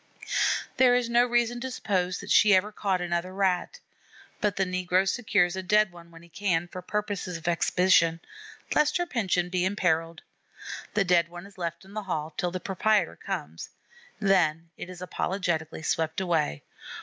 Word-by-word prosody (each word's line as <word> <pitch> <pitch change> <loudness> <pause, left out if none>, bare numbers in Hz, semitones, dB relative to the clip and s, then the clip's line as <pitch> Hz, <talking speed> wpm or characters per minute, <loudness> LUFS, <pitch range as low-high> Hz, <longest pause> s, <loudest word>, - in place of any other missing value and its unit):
There 250 -1 +6
is 245 -1 0
no 240 +1 +4
reason 240 0 +1
to 260 - -3
suppose 185 -7 -1
that - - -6
she 205 -2 +6
ever 195 +3 +1
caught 195 -3 -1
another 175 +1 -2
Rat; 190 - 0 0.6
but 210 -3 0
the 190 - +1
negro 185 +1 +1
secures 195 -5 +1
a 190 - -3
dead 210 +1 +3
one 170 -1 -14
when 165 0 -15
he - - -15
can, 175 -2 -1
for 180 +1 -8
purposes 200 -2 -3
of 165 +1 -10
exhibition, 170 -1 +3 0.5
lest 300 0 +3
her 350 - 0
pension 190 - 0
be 180 -1 0
imperilled. 165 -4 0 0.7
The 205 - +4
dead 175 -2 +3
one 175 +2 -9
is 200 -1 -15
left 170 +1 -4
in 195 - -15
the 215 - -3
hall 160 -5 -4
till 180 +1 -1
the 185 +1 -4
proprietor 200 0 +1
comes; 80 +3 -6 0.5
then 170 -5 +2
it - - -8
is 180 0 -8
apologetically 175 -4 -2
swept 160 +1 0
away. 165 - 0
185 Hz, 175 wpm, -27 LUFS, 170-205 Hz, 0.7 s, There